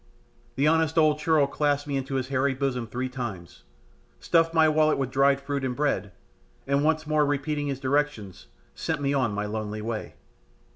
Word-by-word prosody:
The 140 Hz, +3 st, +2 dB
honest 160 Hz, 0 st, +2 dB
old 155 Hz, -1 st, +4 dB
churl 155 Hz, -2 st, +3 dB
clasped 145 Hz, 0 st, -1 dB
me 140 Hz, -, -2 dB
into 135 Hz, 0 st, -3 dB
his 130 Hz, -1 st, -2 dB
hairy 135 Hz, 0 st, +1 dB
bosom 130 Hz, -3 st, -2 dB
three 125 Hz, +4 st, -3 dB
times, 115 Hz, -, -7 dB, 0.5 s
stuffed 165 Hz, -1 st, +2 dB
my 160 Hz, -1 st, +4 dB
wallet 155 Hz, 0 st, +3 dB
with 135 Hz, -2 st, -2 dB
dry 135 Hz, +1 st, +4 dB
fruit 140 Hz, 0 st, -4 dB
and 125 Hz, -1 st, -2 dB
bread, 140 Hz, -8 st, -1 dB, 0.5 s
and 140 Hz, +1 st, +1 dB
once 155 Hz, 0 st, +1 dB
more 155 Hz, 0 st, +2 dB
repeating 145 Hz, +1 st, -1 dB
his 135 Hz, -2 st, -3 dB
directions, 135 Hz, -8 st, -2 dB, 0.3 s
sent -, -, -3 dB
me 140 Hz, 0 st, 0 dB
on 130 Hz, -5 st, +1 dB
my 105 Hz, +1 st, -2 dB
lonely 105 Hz, 0 st, -4 dB
way. 110 Hz, -9 st, -5 dB
140 Hz, 180 wpm, -26 LUFS, 125-150 Hz, 0.5 s, old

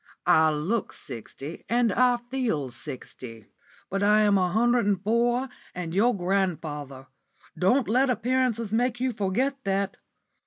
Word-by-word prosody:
I 160 Hz, 0 st, +5 dB
look 175 Hz, +9 st, -2 dB
sixty 140 Hz, +3 st, -9 dB
and 235 Hz, -3 st, +2 dB
I 250 Hz, +2 st, +4 dB
feel 240 Hz, -, -2 dB
sixty, 120 Hz, -5 st, -8 dB, 0.4 s
but 195 Hz, +1 st, -2 dB
I 210 Hz, +1 st, +5 dB
am 205 Hz, -1 st, +4 dB
a 185 Hz, -2 st, +2 dB
hundred 240 Hz, +2 st, +2 dB
and 200 Hz, -3 st, +2 dB
four 240 Hz, +4 st, +1 dB, 0.3 s
and 175 Hz, -2 st, -4 dB
your 220 Hz, +4 st, +3 dB
grandfather. 160 Hz, -8 st, -2 dB, 0.5 s
Don't 240 Hz, -, +2 dB
let 255 Hz, +5 st, +3 dB
appearances 240 Hz, -2 st, 0 dB
make 245 Hz, +1 st, +1 dB
you 255 Hz, 0 st, 0 dB
forget 245 Hz, +7 st, -1 dB
that. 195 Hz, 0 st, -1 dB
205 Hz, 140 wpm, -26 LUFS, 170-240 Hz, 0.5 s, I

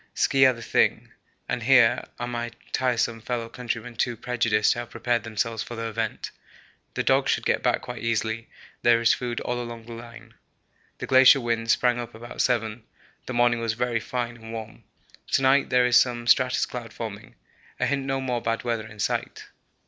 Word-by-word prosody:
Ski 135 Hz, -1 st, +4 dB
are 130 Hz, -, +3 dB
the 115 Hz, -1 st, -10 dB
thing, -, -, +1 dB, 0.4 s
and 120 Hz, -, -2 dB
here 120 Hz, -1 st, +4 dB
are 120 Hz, -, -2 dB
my 120 Hz, -1 st, -3 dB, 0.2 s
tiresome 120 Hz, -2 st, 0 dB
fellow 120 Hz, 0 st, -3 dB
countrymen 120 Hz, 0 st, -5 dB
too 120 Hz, 0 st, -1 dB
prejudiced 115 Hz, -3 st, +1 dB
to -, -, -5 dB
have 120 Hz, -, -6 dB
prepared 120 Hz, -1 st, -1 dB
themselves 115 Hz, 0 st, -2 dB
for 120 Hz, -, -6 dB
the 115 Hz, 0 st, -4 dB
event. 110 Hz, 0 st, -3 dB, 0.6 s
The -, -, 0 dB
dogs -, -, +2 dB
should -, -, 0 dB
get -, -, +1 dB
back -, -, +1 dB
quite 125 Hz, -2 st, -7 dB
easily; 115 Hz, 0 st, -2 dB, 0.3 s
there 120 Hz, -1 st, +5 dB
is 115 Hz, -, +4 dB
food 120 Hz, -1 st, -3 dB
all 120 Hz, 0 st, -2 dB
along 120 Hz, -1 st, -8 dB
the 120 Hz, -, -11 dB
line. 115 Hz, 0 st, -11 dB, 0.6 s
The -, -, -5 dB
glacier 130 Hz, +1 st, +7 dB
wind 115 Hz, -2 st, -2 dB
sprang 120 Hz, +1 st, +3 dB
up 120 Hz, -1 st, -7 dB
about 120 Hz, +1 st, -5 dB
7; 115 Hz, -2 st, 0 dB, 0.5 s
the 130 Hz, -, -4 dB
morning 120 Hz, -1 st, +3 dB
was 115 Hz, -1 st, -1 dB
very 120 Hz, 0 st, -1 dB
fine 120 Hz, 0 st, -4 dB
and 115 Hz, 0 st, -11 dB
warm. 110 Hz, -1 st, -8 dB, 0.5 s
To 135 Hz, -, +3 dB
night 135 Hz, +1 st, +4 dB
there 125 Hz, 0 st, +4 dB
is 125 Hz, 0 st, +5 dB
some 120 Hz, -2 st, +2 dB
stratus 125 Hz, +2 st, +3 dB
cloud 120 Hz, -3 st, -8 dB
forming 110 Hz, -2 st, -7 dB, 0.4 s
a -, -, +2 dB
hint 140 Hz, -1 st, 0 dB
no 135 Hz, 0 st, -1 dB
more 125 Hz, -3 st, -2 dB
bad 115 Hz, 0 st, -2 dB
weather 115 Hz, -2 st, -2 dB
in 110 Hz, -, -13 dB
sight. 105 Hz, -, -3 dB
120 Hz, 195 wpm, -25 LUFS, 115-125 Hz, 0.6 s, glacier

